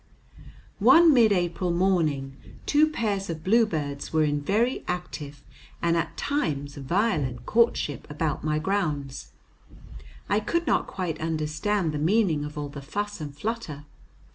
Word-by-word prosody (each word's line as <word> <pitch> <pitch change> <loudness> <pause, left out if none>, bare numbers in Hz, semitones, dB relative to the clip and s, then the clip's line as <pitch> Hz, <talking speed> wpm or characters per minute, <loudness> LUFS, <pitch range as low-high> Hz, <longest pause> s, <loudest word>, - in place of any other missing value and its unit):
One 335 -2 +7
mid 230 -5 +5
April 180 -1 0
morning 165 -7 +1 0.3
two 305 +1 +4
pairs 205 -9 -2
of 160 -1 -5
bluebirds 165 -10 +1
were 160 -1 +3
in 145 -1 0
very 225 - +1
active 150 -5 -5 0.4
and 170 0 +1
at 165 - -2
times 145 - -2
violent 140 - -1
courtship 230 - +1
about 150 0 -2
my 150 0 0
grounds. 155 -6 -2 1.0
I 205 - +2
could 340 +10 -1
not - - +1
quite 170 -5 -4
understand 160 +4 -1
the 150 - -3
meaning 170 -2 +2
of 150 +1 -7
all 145 -1 -3
the 140 0 -8
fuss 205 +6 -4
and 145 -2 -7
flutter. 170 -8 -4
165 Hz, 140 wpm, -26 LUFS, 145-205 Hz, 1.0 s, One